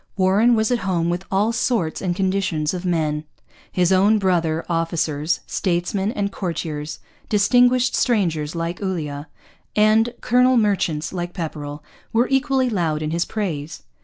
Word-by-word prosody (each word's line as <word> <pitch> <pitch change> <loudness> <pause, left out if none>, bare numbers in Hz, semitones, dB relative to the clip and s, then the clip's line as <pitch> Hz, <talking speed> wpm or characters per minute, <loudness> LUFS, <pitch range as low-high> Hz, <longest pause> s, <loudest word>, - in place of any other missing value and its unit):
Warren 200 +6 +4
was 220 +1 +1
at 245 - +2
home 175 -4 0
with 175 +2 -3
all 205 +4 +2
sorts 225 -8 -1
and 180 -2 -1
conditions 185 -5 0
of 180 0 -5
men. 155 -3 0 0.5
His 180 0 +2
own 200 +3 +4
brother 170 -5 0
officers, 165 -2 -1
statesmen 190 +3 -1
and 200 -3 -2
courtiers, 160 -5 -4 0.3
distinguished 245 +4 +4
strangers 170 - 0
like 170 +2 -3
Ulloa, 155 -6 -3 0.5
and 215 +2 +4
colonial 250 +1 +4
merchants 190 -8 0
like 175 -1 -4
Pepperrell, 150 -3 -5 0.3
were 235 +2 +3
equally 270 -1 +2
loud 165 -9 -1
in 155 - -2
his 170 +1 0
praise. 165 -8 -4
185 Hz, 140 wpm, -21 LUFS, 160-215 Hz, 0.5 s, Warren